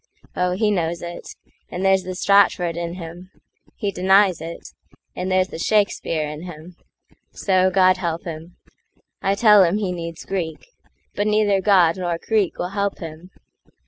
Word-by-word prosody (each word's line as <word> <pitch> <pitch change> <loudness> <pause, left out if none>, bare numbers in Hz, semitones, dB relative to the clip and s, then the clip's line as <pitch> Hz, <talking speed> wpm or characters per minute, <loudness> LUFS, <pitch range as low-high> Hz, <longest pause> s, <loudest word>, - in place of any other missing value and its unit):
Oh, 180 0 0
he 210 +3 +1
knows 170 -3 -1
it,—And 175 +1 -8
there's 190 0 +4
the 185 0 -6
Stratford 185 -3 +3
in 170 0 -4
him; 175 +1 -9 0.5
he 205 - -2
denies 190 0 +3
it, 165 +1 -8 0.5
And 185 +1 -3
there's 185 0 +2
the - - -8
Shakespeare 170 -6 0
in 150 +1 -7
him. 175 0 -10 0.6
So, 185 -1 +2
God 185 0 +4
help 170 -2 -3
him!I 170 +3 -7
tell 210 -2 +6
him 180 +3 +1
he 200 -4 -2
needs 170 -2 -6
Greek; 170 -5 -4 0.5
but 205 +1 -1
neither 210 -2 +2
GodNor 175 -2 +3
Greek 215 -5 +1
will 180 - -3
help 200 0 -2
him. 165 +1 -9
180 Hz, 145 wpm, -21 LUFS, 170-195 Hz, 0.6 s, tell